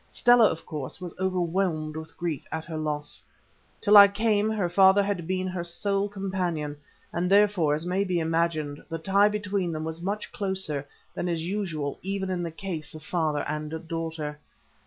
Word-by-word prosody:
Stella, 240 -2 +5
of 165 -5 0
course, 150 -3 -5
was 180 -2 -6
overwhelmed 175 -4 0
with 160 0 -8
grief 170 -5 -3
at 160 0 -3
her 165 - -6
loss. 150 -1 -2 0.6
Till 210 -1 +4
I 200 0 +11
came 210 +1 +1
her 210 -5 0
father 190 +3 +5
had 195 -5 -2
been 185 0 -1
her 180 -2 -3
sole 195 +4 -1
companion, 180 -7 -2 0.4
and 175 +1 0
therefore, 195 -7 +4
as 155 +3 -3
may 185 +2 +1
be 180 -3 0
imagined, 160 -3 -1
the 165 - -3
tie 195 +5 +4
between 205 -4 -1
them 155 -1 -3
was 160 +1 -4
much 200 +4 -3
closer 190 -8 -2 0.3
than 180 - -2
is 165 -1 -2
usual 170 -7 -3
even 190 0 -2
in 180 -1 -1
the 170 - -2
case 165 -2 -5
of 155 - -9
father 155 -3 0
and 155 +2 -4
daughter. 160 -3 -4
175 Hz, 180 wpm, -27 LUFS, 160-195 Hz, 0.6 s, I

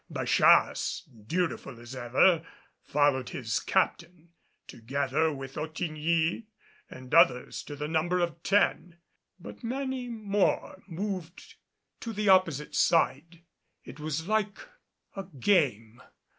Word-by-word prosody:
Bachasse, - - +3 0.2
dutiful 165 -7 -2
as 120 +2 -10
ever, 130 +8 +3 0.4
followed 140 -3 +1
his 115 -3 -2
captain, 170 -3 -1 0.4
together 140 +6 -1
with 135 -2 -8
Ottigny 160 +4 -1 0.4
and 130 +1 -11
others 125 -6 +4
to 145 - -9
the 150 +1 -4
number 165 +3 0
of 170 -1 -2
ten. 180 -3 +1 0.4
But - - -11
many 260 +1 -3
more 205 -3 -1
moved 185 -1 -6 0.5
to 230 - -6
the 210 -1 0
opposite 165 -6 +3
side. 170 0 +1 0.4
It - - -12
was 155 +2 -4
like 210 -1 0 0.6
a 195 -1 -5
game. 125 - +1
165 Hz, 110 wpm, -28 LUFS, 140-190 Hz, 0.6 s, others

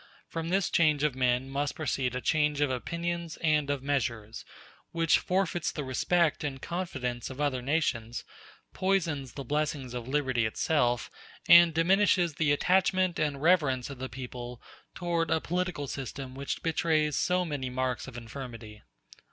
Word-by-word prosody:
From 165 0 -4
this 190 +1 +1
change 155 -3 +3
of 150 -3 +2
men 125 0 +1
must 140 +2 -2
proceed 130 -4 -1
a 125 - -2
change 150 -1 +1
of 145 -2 +2
opinions 170 +4 -3
and 150 -3 +2
of 140 -2 -1
measures, 115 -6 -2 0.5
which 165 -1 +3
forfeits 180 -2 0
the 150 - -4
respect 155 +6 +1
and 135 -2 -3
confidence 130 -8 -4
of 130 +1 -9
other 140 -4 0
nations, 125 -5 -1 0.5
poisons 165 -9 0
the 140 - -6
blessings 145 -2 -2
of 120 -1 -5
liberty 130 -5 +1
itself, 120 0 0 0.4
and 170 0 +9
diminishes 180 0 +3
the 150 0 +1
attachment 185 +3 +2
and 145 -2 -1
reverence 145 -7 +3
of 135 - -9
the 130 0 -4
people 125 -1 -7 0.4
toward 170 -2 -1
a 160 - +2
political 175 -3 -2
system 135 -1 -6
which 135 +1 -4
betrays 155 -2 +1
so 180 0 +1
many 145 -5 -3
marks 130 0 -2
of 130 -3 -8
infirmity." 115 -3 -8
145 Hz, 150 wpm, -29 LUFS, 130-165 Hz, 0.5 s, and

